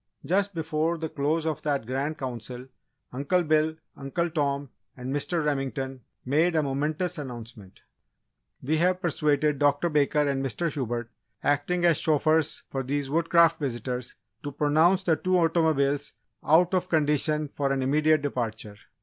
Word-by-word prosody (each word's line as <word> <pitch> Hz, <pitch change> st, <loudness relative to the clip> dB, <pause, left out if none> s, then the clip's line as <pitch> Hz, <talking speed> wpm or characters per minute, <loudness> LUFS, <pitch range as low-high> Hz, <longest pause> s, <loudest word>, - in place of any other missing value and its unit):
Just 200 Hz, +2 st, +1 dB
before 160 Hz, +1 st, -1 dB
the 160 Hz, 0 st, -4 dB
close 155 Hz, +3 st, -1 dB
of 155 Hz, -3 st, -2 dB
that 140 Hz, -5 st, -1 dB
Grand 135 Hz, +5 st, -2 dB
Council 125 Hz, -1 st, -6 dB, 0.5 s
Uncle 145 Hz, +8 st, +1 dB
Bill, 155 Hz, 0 st, +2 dB, 0.2 s
Uncle 165 Hz, +5 st, -2 dB
Tom, 140 Hz, -3 st, -1 dB, 0.3 s
and 130 Hz, +1 st, -4 dB
Mr. 160 Hz, +2 st, -1 dB
Remington 135 Hz, -2 st, -2 dB, 0.2 s
made 160 Hz, +6 st, +2 dB
a 155 Hz, -, +3 dB
momentous 150 Hz, +5 st, -2 dB
announcement. 115 Hz, -7 st, -9 dB, 0.8 s
"We 155 Hz, +5 st, +1 dB
have 180 Hz, +2 st, +2 dB
persuaded 150 Hz, -3 st, +1 dB
Dr. 145 Hz, +3 st, +2 dB
Baker 150 Hz, -1 st, +2 dB
and 135 Hz, -1 st, -1 dB
Mr. 155 Hz, +6 st, -1 dB
Hubert, 120 Hz, -4 st, -3 dB, 0.3 s
acting 145 Hz, +5 st, +1 dB
as 170 Hz, -3 st, +4 dB
chauffeurs 155 Hz, 0 st, +2 dB
for 135 Hz, -, -2 dB
these 140 Hz, +1 st, -3 dB
Woodcraft 165 Hz, +1 st, +4 dB
visitors, 125 Hz, -2 st, -4 dB, 0.3 s
to 145 Hz, -, -5 dB
pronounce 155 Hz, +6 st, +3 dB
the 165 Hz, -4 st, +2 dB
two 185 Hz, 0 st, +1 dB
automobiles 155 Hz, -4 st, +1 dB, 0.3 s
out 170 Hz, +4 st, +4 dB
of 185 Hz, 0 st, 0 dB
condition 150 Hz, -1 st, +1 dB
for 140 Hz, 0 st, -2 dB
an 135 Hz, -1 st, 0 dB
immediate 150 Hz, +2 st, +2 dB
departure. 110 Hz, -6 st, -4 dB
150 Hz, 145 wpm, -26 LUFS, 135-160 Hz, 0.8 s, as